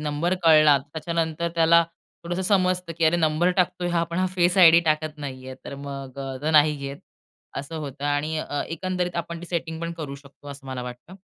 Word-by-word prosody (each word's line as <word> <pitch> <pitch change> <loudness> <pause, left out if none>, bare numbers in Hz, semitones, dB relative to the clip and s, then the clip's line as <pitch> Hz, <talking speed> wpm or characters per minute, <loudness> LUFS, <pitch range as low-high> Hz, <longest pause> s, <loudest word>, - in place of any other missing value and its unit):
Number 150 +4 -1
कळला 155 -3 +7
त्याच्यानंतर 160 +3 -3
त्याला 170 0 +5 0.4
थोडंसं 175 +2 -2
समजतं 185 -3 +1
की 165 - +2
अरे 165 +2 +4
नंबर 160 +2 +2
टाकतोय 180 -1 +1
हा 170 -1 +1
पण 170 +2 -4
हा 185 - +2
फेस 175 +1 +2
आयडी 170 -1 +8
टाकत 155 -1 0
नाही 130 -3 -7
आहे, 130 - -7
तर 140 - -7
मग 140 -1 -8
अ, 135 -1 -5
तो 155 - 0
नाही 150 -1 +5
घेत. 140 0 -6 0.6
असं 145 +4 -5
होतं 145 -1 -6
आणि 145 +2 0
अ, 145 -1 -3
एकंदरीत 180 +1 -3
आपण 170 0 -4
ती 175 - -8
सेटिंग 165 -2 -4
पण 170 0 -3
करू 140 -3 -5
शकतो 140 +1 -14
असं 140 -1 -10
मला 130 -1 -5
वाटतं. 125 +9 -9
160 Hz, 200 wpm, -24 LUFS, 145-170 Hz, 0.6 s, आयडी